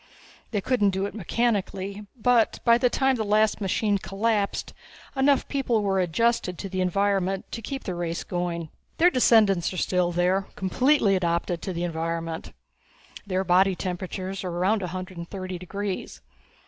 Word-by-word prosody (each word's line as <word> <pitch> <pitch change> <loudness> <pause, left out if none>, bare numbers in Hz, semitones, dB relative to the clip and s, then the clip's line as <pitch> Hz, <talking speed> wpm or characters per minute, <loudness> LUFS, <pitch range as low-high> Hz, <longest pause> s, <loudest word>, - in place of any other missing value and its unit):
They 205 -4 -1
couldn't 210 -3 +2
do 190 +1 -1
it 200 - -5
mechanically, 205 -1 -2
but 235 0 +3
by 235 0 +6
the 250 0 +3
time 265 +1 +2
the 220 - -1
last 215 +1 +2
machine 200 +1 +1
collapsed, 205 +1 -1 0.4
enough 270 0 +3
people 245 -6 0
were 195 -1 +1
adjusted 185 +1 +1
to 195 - -6
the 185 0 -2
environment 195 0 +1
to 230 - -5
keep 270 +4 -5
the 185 - -3
race 170 -1 -3
going. 175 -2 -3 0.3
"Their 350 +2 +5
descendants 215 - +4
are - - -6
still 180 -1 +1
there, 180 +3 +1
completely 215 +2 +2
adapted 170 -1 -1
to 190 - -4
the 170 -1 -3
environment. 165 0 -3 0.8
Their 190 -1 0
body 190 +1 +4
temperatures 185 +1 -4
are 185 - -3
around 185 +5 +1
a 180 - -2
hundred 185 +1 -6
and 170 - -7
thirty 185 -2 -5
degrees. 195 +2 -5
195 Hz, 160 wpm, -26 LUFS, 180-215 Hz, 0.8 s, by